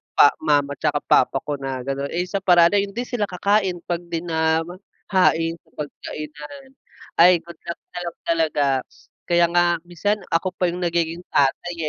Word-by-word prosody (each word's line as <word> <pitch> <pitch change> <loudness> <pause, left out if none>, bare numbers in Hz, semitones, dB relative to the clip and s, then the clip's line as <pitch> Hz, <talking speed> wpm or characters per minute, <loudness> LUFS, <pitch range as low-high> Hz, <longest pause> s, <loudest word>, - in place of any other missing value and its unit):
pa 145 - +7
mama 145 -2 +2
tsaka 145 0 0
papa - - +2
ko 145 -1 -4
na 135 -2 -4
ganon, 140 +1 -3
eh, 175 +4 -2
sa 185 +2 -3
paraan 175 -3 +5
na 205 - +3
yun, 200 0 -3
hindi 240 - -2
sila 245 -4 -2
kakain 190 -1 0
'pag 175 -1 -2
'di 165 -1 -3
na 160 -1 +1
mahain 175 -2 -1
sa - - -32
pagkainan. 150 - -8 0.5
Ay, 175 0 +6
good 170 -1 -13
luck 170 - -5
na 180 - -6
lang 170 - -7
talaga. 160 -3 +1 0.6
Kaya 175 -1 +4
nga 175 0 +3
minsan 200 +4 -2
ako 180 +3 0
pa 180 -1 0
yung 175 - -6
nagiging 170 0 -1
tatay, 145 +5 +1
170 Hz, 175 wpm, -22 LUFS, 160-180 Hz, 0.6 s, pa